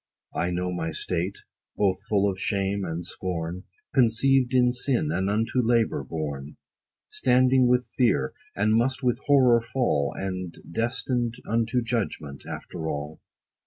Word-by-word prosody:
I 85 - 0
know 90 +1 -1
my 80 -2 -2
state, 90 +4 -2 0.4
both 95 -3 +2
full 100 -1 +3
of 95 -1 -2
shame 100 -1 0
and 85 0 -4
scorn, 90 0 -4 0.3
Conceived 130 +1 +4
in 125 -1 +4
sin, 125 - +1
and 95 +4 0
unto 115 +4 +1
labor 115 -1 +2
born, 75 -3 -5 0.5
Standing 130 0 +3
with 125 -2 +1
fear, 125 -2 +2 0.2
and 110 +1 +2
must 125 +4 +1
with 125 0 +1
horror 130 -5 +5
fall, 115 - 0
And 95 -3 -4
destined 120 +2 -1
unto 115 +2 +1
judgment, 100 - -3
after 80 -2 -5
all. 75 +1 -5
110 Hz, 135 wpm, -26 LUFS, 90-125 Hz, 0.5 s, horror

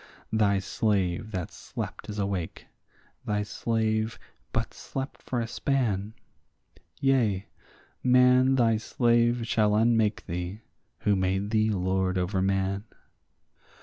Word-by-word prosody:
Thy 105 -2 +3
slave 100 0 0
that 90 -5 -4
slept - - -7
is 105 - -5
awake; 100 -4 -3 0.6
thy 105 0 -1
slave 110 +1 -1 0.3
but - - -2
slept 135 +1 -6
for 125 - -2
a 115 - -2
span; 110 -6 -1 0.8
Yea, 115 -8 +2 0.6
man 125 +1 +5
thy 115 -3 +3
slave 120 +1 +2
shall 105 -2 +2
unmake 115 -1 +2
thee, 90 +5 -4 0.4
who 105 - +3
made 95 +2 0
thee 110 -1 +3
lord 95 -1 0
over 95 +1 0
man. 95 +1 0
105 Hz, 115 wpm, -27 LUFS, 95-115 Hz, 0.8 s, man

